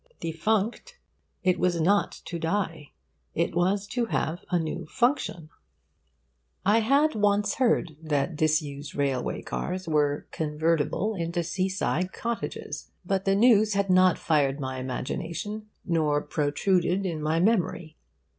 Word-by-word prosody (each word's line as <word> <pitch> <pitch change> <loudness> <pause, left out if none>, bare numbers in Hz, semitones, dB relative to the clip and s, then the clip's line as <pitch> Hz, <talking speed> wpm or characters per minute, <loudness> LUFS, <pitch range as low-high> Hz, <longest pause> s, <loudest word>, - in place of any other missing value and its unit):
Defunct, 215 - -1 0.5
it 180 -1 +2
was 175 -2 +1
not 200 +5 +3
to 170 - -5
die. 165 -3 -2 0.4
It 170 +1 0
was 190 +4 +1
to 245 -2 0
have 170 -5 -2
a 180 - +2
new 165 0 -3
function. 240 - 0 1.1
I 210 +3 +5
had 280 +7 +3
once 205 -1 +2
heard 230 - +2
that 155 +1 -1
disused 150 -2 -1
railway 135 -3 -1
cars 185 0 -4
were 150 -2 +1
convertible 160 +5 0
into 170 -2 -2
sea 185 +3 -1
side 185 -1 -1
cottages. 155 -9 -4 0.2
But 190 +1 0
the 195 0 +3
news 215 -1 +5
had 200 -1 +1
not 185 -1 +5
fired 145 -3 +1
my 130 -1 -4
imagination 170 +11 -4 0.2
nor 155 -4 +2
protruded 180 +5 +1
in 165 -4 -2
my 155 +2 +1
memory. 175 -5 +1
175 Hz, 130 wpm, -27 LUFS, 155-200 Hz, 1.1 s, I